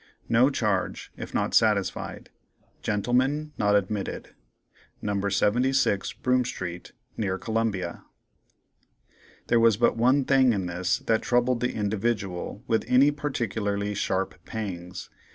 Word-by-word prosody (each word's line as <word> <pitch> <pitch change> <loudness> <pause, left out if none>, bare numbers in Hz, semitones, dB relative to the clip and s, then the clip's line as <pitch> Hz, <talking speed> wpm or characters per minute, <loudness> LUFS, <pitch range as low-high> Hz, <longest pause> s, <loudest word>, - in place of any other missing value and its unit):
No 120 +4 +5
charge, 105 -8 -1
if - - -7
not - - -1
satisfied. 105 -3 +1 0.5
Gentlemen 130 +8 0
not 105 0 +3
admitted. 100 0 -2 0.7
No. 100 -1 -1
76 120 +1 +1
Broome 125 0 +1
street, 90 -7 -6 0.2
near 95 -3 -1
Columbia." 110 -5 -2 1.4
There 120 - +3
was 115 -2 +4
but 120 - +3
one 130 +4 +3
thing 130 -3 +4
in 95 -3 -2
this 90 +1 0
that 110 -1 +2
troubled 125 0 +2
the 125 +1 -1
"Individual" 105 -1 -2
with 115 -3 +1
any 135 +3 +5
particularly 105 -8 -2
sharp 95 -3 -2
pangs. 90 -4 -6
110 Hz, 115 wpm, -26 LUFS, 100-125 Hz, 1.4 s, No